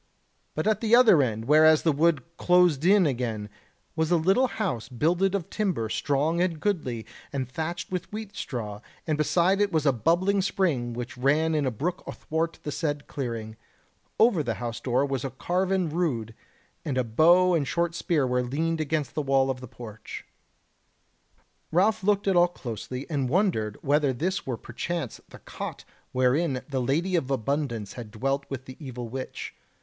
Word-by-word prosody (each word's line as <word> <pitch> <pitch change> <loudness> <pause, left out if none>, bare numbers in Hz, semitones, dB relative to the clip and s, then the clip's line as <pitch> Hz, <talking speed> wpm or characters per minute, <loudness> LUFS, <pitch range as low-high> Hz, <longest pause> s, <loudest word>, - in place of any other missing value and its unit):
But - - -1
at 215 -1 +2
the 225 0 0
further 235 - +7
end, 115 -3 -1
whereas 155 +2 +6
the 160 - +4
wood 155 +1 +2
closed 180 -5 +4
in 195 0 +6
again, 115 -6 -2 0.4
was 160 -1 0
a 175 - +4
little 195 +11 +3
house 180 - -3
builded 175 +9 +1
of 180 -5 -4
timber, 180 - -1
strong 150 +7 0
and 175 -3 0
goodly, 150 - -2 0.3
and 135 -3 -2
thatched 160 +8 -4
with 180 -1 -4
wheat 210 -1 -7
straw; 105 -5 -5 0.2
and 155 - 0
beside 175 +6 +2
it 205 -1 +2
was 160 -3 +1
a 140 - +4
bubbling 180 - +2
spring 150 -11 0
which 125 +1 -6
ran 155 +5 +2
in 150 -3 +1
a - - +3
brook 165 - -3
athwart 165 +1 -3
the 150 - -3
said 145 -1 -2
clearing; 115 -5 -5 0.6
over 220 -7 +5
the 120 -6 -2
house 120 -1 -4
door 130 +2 +1
was 135 -3 -2
a 135 - -2
carven 185 +6 0
rood, 145 -10 -1 0.5
and 140 -4 -2
a 130 - +2
bow 175 +10 +5
and 150 -5 +1
short 170 +4 0
spear 160 -4 +1
were 125 0 +1
leaned 160 +6 -1
against 155 -1 -1
the 155 - -1
wall 135 -1 +2
of 125 -1 -6
the 130 - -8
porch. 110 -2 -9 1.5
Ralph 195 +5 +2
looked 200 0 +2
at 195 - +3
all 175 0 +6
closely, 125 -3 -6
and 140 -6 -1
wondered 145 - +1
whether 145 -1 +2
this 180 +8 -2
were 125 -3 -2
perchance 135 +4 -4
the - - -12
cot - - -7 0.3
wherein 130 +2 +1
the 135 -3 -2
Lady 160 +9 0
of 140 -6 0
Abundance 130 -4 -2
had 120 -3 -8
dwelt 135 +6 -2
with 130 -1 -5
the 130 - -10
evil 125 -3 -6
witch. 130 +3 -6
150 Hz, 175 wpm, -26 LUFS, 125-175 Hz, 1.5 s, further